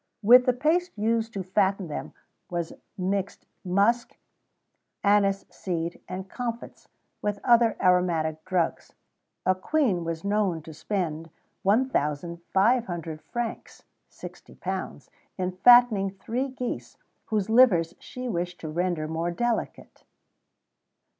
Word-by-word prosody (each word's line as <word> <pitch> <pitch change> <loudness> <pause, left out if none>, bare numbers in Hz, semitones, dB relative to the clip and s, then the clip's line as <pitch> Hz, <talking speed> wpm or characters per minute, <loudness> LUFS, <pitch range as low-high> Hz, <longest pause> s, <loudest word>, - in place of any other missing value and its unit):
With 250 +4 +7
the 250 - +5
paste 320 +4 0
used 225 +1 0
to 195 - -3
fatten 190 0 +1
them 150 - -6 0.4
was 170 -2 -3 0.2
mixed 195 +1 -2 0.2
musk, 200 +6 +1 0.9
anise 200 -1 +3
seed, 170 -2 -4
and 185 +1 -6
comfits, 235 +1 -6 0.3
with 205 -1 -1
other 235 -2 +4
aromatic 165 -4 +2
drugs. 185 -3 -1 0.5
A 185 - +4
Queen 195 - 0
was 165 -1 -4
known 200 -5 0
to 160 - -10
spend 165 -2 -3 0.3
1,500 175 - 0
francs 240 -1 -5 0.3
(£60) - - -7 0.3
in 185 -1 -1
fattening 240 -3 +6
three 225 +7 -3
geese, 255 -2 -5 0.3
whose 210 -3 -1
livers 190 -9 +5
she 250 0 -7
wished 180 -4 -3
to 155 - -5
render 170 -1 -1
more 165 +2 -2
delicate." 235 +7 -3
195 Hz, 110 wpm, -26 LUFS, 170-230 Hz, 0.9 s, With